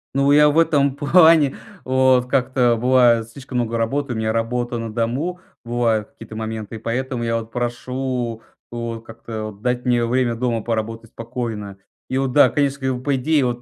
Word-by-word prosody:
Ну, 140 +1 +3
я 150 +1 +6
в 145 - 0
этом 140 -4 +3
плане, 160 -1 +5 0.3
вот, 130 -1 +3
как-то 125 -2 +2
бываю 120 -1 +4
слишком 125 +2 -6
много 115 -1 -1
работы- 130 +4 -1
у - - -5
меня 110 0 -1
работа 120 +1 -1
на 115 -1 -5
дому. 130 +11 -2 0.2
Бывают 115 -3 0
какие-то 110 -1 -11
моменты. 110 0 -5
И - - -7
поэтому 125 +2 -3
я 115 0 0
вот 115 0 -7
прошу, 120 -1 -3 0.3
вот, 115 -1 -5
как-то 110 -1 -7
вот 100 0 -18
дать 125 +1 -1
мне 120 -1 +2
время 125 0 +1
дома 115 -2 -1
поработать 115 0 -4
спокойно. 115 -4 -5 0.3
И 130 - -1
вот, 135 -1 0
да, 145 - +6
конечно, 140 -1 0
когда 130 -1 -1
в 125 - -8
по 140 +1 +1
идее 145 +1 +2
вот, 120 -1 -2
120 Hz, 185 wpm, -21 LUFS, 115-130 Hz, 0.3 s, я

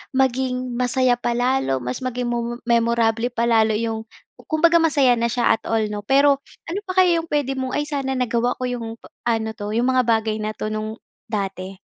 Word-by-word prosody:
maging 255 -1 0
masaya 250 0 +2
pa 240 0 -1
lalo, 245 - 0
mas 125 +1 -3
maging 250 -1 -3
momo 240 0 -2
memorable 235 -1 +2
pa 235 -1 -2
lalo 220 -2 +3
'yong 225 0 -3 0.4
kumbaga 330 +2 +4
masaya 280 -7 +3
na 235 - +2
siya 240 +1 +1
at - - +2
all, 225 -1 +1
'no, 210 - -3
pero, 275 +6 +3 0.2
ano 345 +4 -4
pa 370 - -4
kaya 345 -2 +3
'yong 330 - -6
puwede 270 -3 -1
mong, 260 0 -2
"Ay 295 - +1
sana 275 -3 -2
nagawa 245 -1 0
ko - - -7
'yong 240 -3 -3
p - - -36 0.2
ano 225 -1 0
'to, 210 0 -5
'yong 240 +2 +2
mga 255 -2 +2
bagay 220 -1 +1
na 215 0 -3
'to, 215 - -4
no'ng 215 0 -3 0.3
dati? 195 -3 -4
240 Hz, 200 wpm, -22 LUFS, 225-260 Hz, 0.4 s, kumbaga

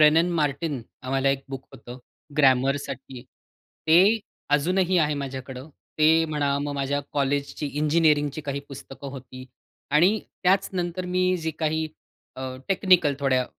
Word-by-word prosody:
रेनन 160 +3 +5
Martin 145 -1 -1 0.2
आम्हाला 135 +1 0
एक 135 0 -2
book 135 -1 -7
होतं. 125 -1 -10 0.4
ग्रॅमरसाठी 135 -1 +1 0.6
ते 160 +1 +6 0.6
अजूनही 180 +4 +1
आहे 150 -2 +2
माझ्याकडं. 130 0 -6 0.3
ते 160 +1 +5
म्हणा, 145 -3 0
मग 145 0 -3
माझ्या 140 +1 -1
कॉलेजची 140 +1 -1
इंजिनिअरिंगची 150 0 +2
काही 140 -1 -4
पुस्तकं 135 0 -9
होती 130 -1 -10 0.5
आणि 180 +8 +4 0.2
त्यात 195 +1 +3
नंतर 180 0 -2
मी 185 0 +1
जी 160 -2 -3
काही 160 0 0 0.5
अ, 130 - -6 0.3
टेक्निकल 185 -6 +4
थोड्या 130 -2 +2
145 Hz, 130 wpm, -25 LUFS, 135-165 Hz, 0.6 s, ते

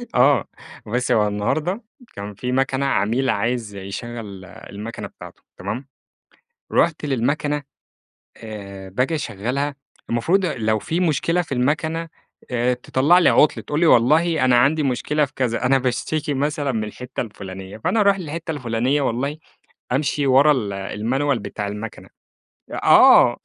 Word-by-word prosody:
آه، 135 +3 +4 0.4
بُصي، 125 +4 0
هو 105 -1 +3
النهارده 155 - -1 0.3
كان 100 +1 -6
في 125 +4 -3
مَكَنة 135 +1 +1
عميل 120 +2 +1
عايز 110 -1 -1
يشغل 100 0 -7
المَكَنة 105 +4 -8
بتاعته، - - -13 0.2
تمام؟ 110 +9 -5 0.9
رُحت 160 -2 +2
للمَكَنة 145 +3 0 0.8
آآ 100 -3 -9
باجي 125 - 0
أشغّلها 140 +4 -2 0.3
المفروض 175 +12 +2
لو 110 -7 0
في 165 - -2
مشكلة 170 +1 +1
في 165 - -11
المَكَنة 160 +6 0 0.4
آآ 125 +1 +1
تطَلّع 135 +7 +3
لي 175 - +5
عُطل، 150 - +4
تقول 150 +1 -2
لي 170 - +3
والله 155 +4 +4
أنا 125 -1 +5
عندي 145 +5 +3
مشكلة 145 +3 +1
في 135 - -17
كذا، 125 -1 -1
أنا 135 +1 +4
باشتكي 145 +5 -1
مثلًا 145 0 -1
من 110 -2 -1
الحِتّة 120 +4 -6
الفُلانية، 95 -3 -8
فأنا 220 - 0
أروح 200 -1 +4
للحِتّة 165 0 -5
الفُلانية 130 +1 0
والله 140 +5 -1 0.5
أمشي 140 +1 0
ورا 140 +3 +6
ال 105 -8 0
المانيوال 115 +7 -1
بتاع 105 0 -5
المَكَنة، 105 +2 -7 0.6
آه، - - +6
130 Hz, 140 wpm, -21 LUFS, 110-150 Hz, 0.9 s, ورا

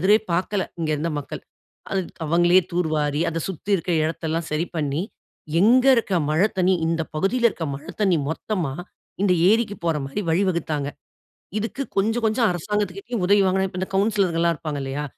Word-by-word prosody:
எதிரே 200 +5 +5 0.2
பார்க்கல, 190 +3 0 0.2
இங்கு 155 -1 0
இருந்த 165 +3 -2
மக்கள் - - -7 0.9
அவங்களே 175 +3 +5
தூர்வாரி, 155 -3 0
அதை 165 0 -2
சுத்தி 190 +3 -6
இருக்கிற 175 -1 0
இடத்தை 160 +1 -3
எல்லாம் 165 0 -1
சரி 160 +3 0
பண்ணி, 150 +2 -1 0.6
எங்கு 250 +6 +5
இருக்கிற 195 -6 +1
மழை 170 +7 +3
தண்ணீ 185 0 +3
இந்த 165 0 0
பகுதியில 235 +9 +2
இருக்கிற 165 -6 -5
மழை 140 - -10
தண்ணீ 190 -5 +3
மொத்தமா 165 -4 -2 0.5
இந்த 190 -3 +4 0.2
ஏரிக்கு 220 -2 +1
போற 165 -2 +1
மாதிரி 140 +10 -3
வழிவகுத்தாங்க. 165 -5 0 0.7
இதுக்கு 225 +5 -4 0.2
கொஞ்சம் 225 +4 +1
கொஞ்சம் 220 +1 +2
அரசாங்கத்திட்ட 205 +5 -3
உதவி 200 0 +5
வாங்கினது 190 -1 0
இந்த 190 - -3
கவுன்சிலர்ங்க 195 -4 +2
எல்லாம் 170 -1 +2
இருப்பாங்க 150 -2 -4
இல்லையா, 135 +2 -3
180 Hz, 160 wpm, -23 LUFS, 160-205 Hz, 0.9 s, எதிரே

